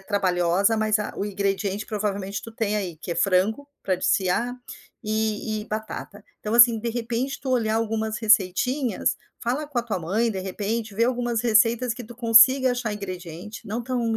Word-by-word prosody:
trabalhosa 190 Hz, 0 st, +1 dB
mas 215 Hz, -1 st, +1 dB
a 210 Hz, -, -4 dB
o 200 Hz, -, -1 dB
ingrediente 200 Hz, 0 st, -2 dB
provavelmente 200 Hz, -2 st, -3 dB
tu 230 Hz, -, -9 dB
tem 220 Hz, -2 st, -1 dB
aí 185 Hz, -6 st, -3 dB
que 170 Hz, +2 st, -5 dB
é -, -, -5 dB
frango, 200 Hz, +10 st, +1 dB
para 190 Hz, -, +1 dB
desfiar, 190 Hz, +6 st, 0 dB, 0.5 s
e 215 Hz, 0 st, -1 dB
e -, -, -10 dB
batata. 215 Hz, -1 st, -6 dB, 0.2 s
Então 215 Hz, +1 st, -3 dB
assim 235 Hz, -1 st, +7 dB
de 235 Hz, -, -3 dB
repente 240 Hz, +3 st, -3 dB
tu 265 Hz, -, -4 dB
olhar 225 Hz, -3 st, +1 dB
algumas 220 Hz, -1 st, -1 dB
receitinhas, 225 Hz, +5 st, +2 dB, 0.2 s
fala 255 Hz, +6 st, -1 dB
com 285 Hz, -4 st, -3 dB
a -, -, +1 dB
tua 225 Hz, -5 st, -3 dB
mãe 205 Hz, +8 st, 0 dB
de 195 Hz, -3 st, -4 dB
repente, 210 Hz, +3 st, -3 dB
vê 230 Hz, +3 st, +2 dB
algumas 240 Hz, -2 st, 0 dB
receitas 230 Hz, +1 st, +3 dB
que 245 Hz, -, -8 dB
tu 240 Hz, 0 st, -12 dB
consiga 250 Hz, +3 st, +6 dB
achar 245 Hz, -3 st, -3 dB
ingrediente, 185 Hz, +1 st, -7 dB
não 220 Hz, +4 st, -3 dB
tão 235 Hz, -2 st, -1 dB
220 Hz, 180 wpm, -24 LUFS, 200-235 Hz, 0.5 s, assim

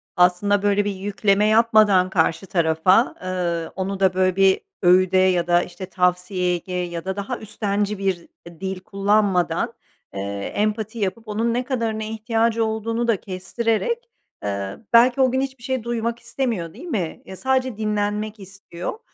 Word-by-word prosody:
Aslında, 185 Hz, +3 st, +3 dB
böyle, 205 Hz, 0 st, +2 dB
bir 205 Hz, -, 0 dB
yükleme 200 Hz, +1 st, +1 dB
yapmadan 215 Hz, -4 st, +4 dB
karşı 165 Hz, 0 st, +1 dB
tarafa, 170 Hz, +6 st, +3 dB
eee, 175 Hz, -3 st, -2 dB
onu 195 Hz, 0 st, -3 dB
da, 190 Hz, -1 st, +3 dB
böyle, 185 Hz, 0 st, +2 dB
bir 195 Hz, -1 st, +4 dB, 0.2 s
öğüde 185 Hz, +1 st, +4 dB
ya 180 Hz, -2 st, +3 dB
da, 175 Hz, 0 st, +4 dB
işte, 180 Hz, +1 st, -8 dB
tavsiyeye 180 Hz, 0 st, 0 dB
ge 180 Hz, +1 st, -9 dB
ya 175 Hz, -1 st, -3 dB
da 190 Hz, 0 st, -2 dB
daha 205 Hz, +5 st, -4 dB
üstenci 205 Hz, -1 st, -2 dB
bir 190 Hz, -3 st, -2 dB, 0.3 s
dil 190 Hz, -1 st, -4 dB
kullanmadan, 195 Hz, 0 st, +1 dB, 0.4 s
eee, 95 Hz, -, -4 dB, 0.3 s
empati 215 Hz, +2 st, -1 dB
yapıp 215 Hz, +3 st, -3 dB
onun 225 Hz, +2 st, 0 dB
ne 250 Hz, +1 st, 0 dB
kadarına 230 Hz, -4 st, -2 dB
ihtiyacı 225 Hz, +1 st, 0 dB
olduğunu 225 Hz, +2 st, -2 dB
da 225 Hz, -4 st, +3 dB
kestirerek, 230 Hz, -, -2 dB, 0.3 s
eee 100 Hz, -1 st, -3 dB, 0.2 s
belki 245 Hz, +3 st, +6 dB
o 255 Hz, -1 st, +4 dB
gün 260 Hz, +1 st, +1 dB
hiçbir 265 Hz, -3 st, -5 dB
şey 260 Hz, -3 st, -2 dB
duymak 235 Hz, 0 st, -2 dB
istemiyor 230 Hz, -8 st, -3 dB
değil 350 Hz, -, -11 dB
mi? 195 Hz, -, -3 dB
Ya, 190 Hz, -, -9 dB
sadece 260 Hz, -3 st, 0 dB
dinlenmek 210 Hz, 0 st, -2 dB
istiyor. 195 Hz, -, -7 dB
200 Hz, 155 wpm, -22 LUFS, 185-225 Hz, 0.4 s, belki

